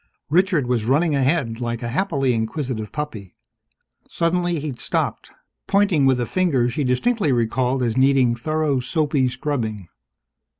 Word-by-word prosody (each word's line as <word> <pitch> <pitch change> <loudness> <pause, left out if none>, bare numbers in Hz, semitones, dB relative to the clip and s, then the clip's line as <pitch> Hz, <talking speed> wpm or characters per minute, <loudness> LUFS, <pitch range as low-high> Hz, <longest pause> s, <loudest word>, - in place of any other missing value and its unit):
Richard 175 -4 +3
was 120 -3 0
running 150 +5 +2
ahead 135 -4 0
like 120 0 -3
a - - -2
happily 135 -2 0
inquisitive 115 -1 -3
puppy. 115 -11 -6 0.7
Suddenly 175 0 0
he'd 140 -4 -5
stopped, - - -2 0.4
pointing 195 -8 +3
with 130 -2 +3
a 120 - 0
finger 145 -7 +1
she 145 +4 -2
distinctly 150 - +1
recalled 125 +2 0
as 115 -2 0
needing 130 -2 +3
thorough 150 +3 -1
soapy 140 0 0
scrubbing. 115 - -3
135 Hz, 135 wpm, -22 LUFS, 120-155 Hz, 0.7 s, Richard